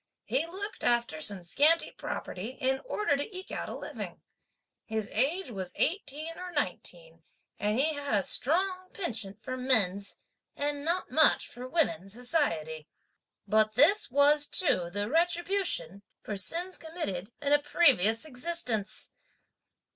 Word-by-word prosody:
He 285 +6 0
looked 400 +5 -6
after 235 -10 +1
some 195 +1 +1
scanty 300 - +3
property 215 +8 -5
in 265 -1 +1
order 420 -11 +1
to 365 +8 -4
eke 375 - -9
out - - -4
a - - -5
living. - - -7 0.6
His 220 -2 -3
age 275 - 0
was 185 -4 -4
eighteen 320 -3 -2
or 365 0 -6
nineteen; 175 - -4 0.4
and 210 +2 +1
he 310 +4 +3
had 285 -5 -1
a 200 - +2
strong 370 - +1
penchant 220 - -4
for 255 +3 -4
men's, 200 -7 +1 0.4
and 290 0 -2
not 345 +4 -1
much - - +5
for 250 +1 -8
women's 220 - 0
society. 170 - -1 0.6
But 215 +1 +3
this 335 - +5
was 290 +2 +5
too 180 - +2
the 205 +3 -2
retribution 335 - 0 0.2
(for 210 - -4
sins 340 - -1
committed) 315 - -4
in 285 0 +1
a 290 - +6
previous 255 - +3
existence! 250 -7 -3
265 Hz, 140 wpm, -30 LUFS, 205-330 Hz, 0.6 s, a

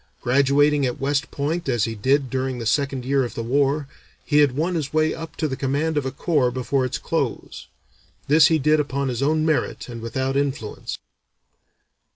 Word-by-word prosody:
Graduating 140 +3 +3
at 125 - -4
West 145 +3 0
Point 150 +2 -2
as 120 -4 +1
he 115 - -1
did 130 +5 +1
during 130 -1 -2
the 115 - -5
second 135 +1 0
year 135 0 +2
of 120 - -5
the 115 - -3
war, 140 +4 +1 0.4
he 150 -1 +3
had 145 -3 +4
won 170 +4 0
his 155 -5 -2
way 155 0 +2
up 165 -1 -8
to 155 - -1
the 135 - -3
command 145 +4 -1
of 145 -3 0
a - - -3
corps 140 -2 +1
before 130 +1 -1
its 130 - -2
close. - - -3 0.6
This 150 +1 +6
he 160 - +3
did 155 +1 +3
upon 140 -2 -1
his 125 0 -3
own 155 +2 +2
merit 155 -2 -1
and 115 -1 -7
without 130 +4 -2
influence." 140 -6 -3
140 Hz, 195 wpm, -23 LUFS, 130-150 Hz, 0.6 s, This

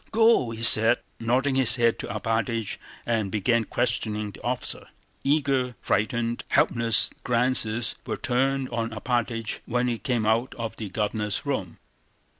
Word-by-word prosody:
"Go," 225 - +4
he 115 0 -6
said, 115 +1 +6 0.2
nodding 130 +4 +1
his 130 -3 +5
head 115 -2 +2
to - - -5
Alpátych, 110 0 -2 0.3
and 110 -4 0
began 115 +3 +1
questioning 110 -4 -1
the - - -14
officer. - - -3 0.4
Eager, 135 -3 +1
frightened, 115 +2 -1
helpless 115 -1 +2
glances 120 -2 +1
were - - -2
turned 135 +1 0
on 115 -1 -2
Alpátych 115 0 -2
when 125 +1 0
he 120 -2 -2
came 120 -6 -1
out 115 +4 +1
of 115 -1 -5
the 110 -3 -5
Governor's 105 0 -2
room. - - -3
115 Hz, 140 wpm, -25 LUFS, 110-125 Hz, 0.4 s, said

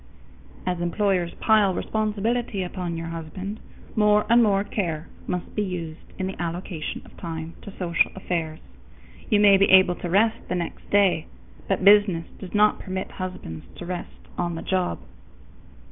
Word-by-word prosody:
_ - - -19
As 180 -1 -1
employers 180 -1 0
pile 210 -4 +3
responsibility 215 0 -1
upon 180 -2 -4
your 165 0 -5
husband, 170 +6 -6 0.4
more 210 -1 +4
and 240 +1 +7
more 200 -3 +3
care 165 -7 -3 0.2
must 180 -1 -3
be 210 - -1
used 170 -5 -5
in 190 - -2
the 190 -2 -5
allocation 170 -1 -4
of - - -16
time 165 -1 -5
to 200 - -10
social 170 -2 +2
affairs. 165 -4 -3 0.7
You 210 -4 +4
may 200 -1 +7
be 195 - +4
able 190 -1 +7
to 175 - -5
rest 220 +5 +3
the - - 0
next 170 -2 -5
day, 195 -5 +3 0.4
but 195 -1 0
business 200 -5 +6
does 190 +1 -8
not 210 0 +4
permit 190 -1 -4
husbands 180 - -6
to 175 - -8
rest 180 0 -7
on 175 -1 -1
the 165 - -6
job. 185 - 0
185 Hz, 160 wpm, -25 LUFS, 170-205 Hz, 0.7 s, and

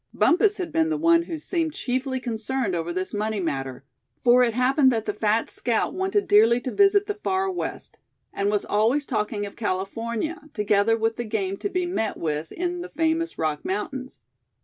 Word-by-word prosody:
Bumpus 410 +4 +3
had 360 -4 -4
been 320 +1 +2
the 320 - 0
one 335 +2 +4
who 335 -1 -5
seemed 320 0 -2
chiefly 260 +1 -2
concerned 235 -2 -2
over 170 0 -2
this 185 +1 -3
money 215 0 -1
matter; 135 -6 -3 0.4
for 245 0 +6
it 235 -3 +2
happened 260 +2 +4
that 225 -2 -1
the 210 - -1
fat 215 +2 +1
scout 235 -2 -1
wanted 385 +2 0
dearly 225 +3 +5
to 255 - -4
visit 405 0 +4
the 415 - -2
Far 385 -2 -1
West, 360 - -6 0.3
and 200 0 0
was 205 -1 0
always 230 +8 +2
talking 210 -4 -2
of 200 - -9
California, 230 - -3
together 210 +1 +2
with 225 0 0
the 240 - -2
game 205 -4 -2
to 405 - -3
be 365 -2 -1
met 225 - -2
with 155 0 -3
in 355 0 -3
the 360 - -7
famous 330 0 -1
Rock 155 -2 -1
Mountains. 255 +7 -4
240 Hz, 190 wpm, -24 LUFS, 210-330 Hz, 0.4 s, for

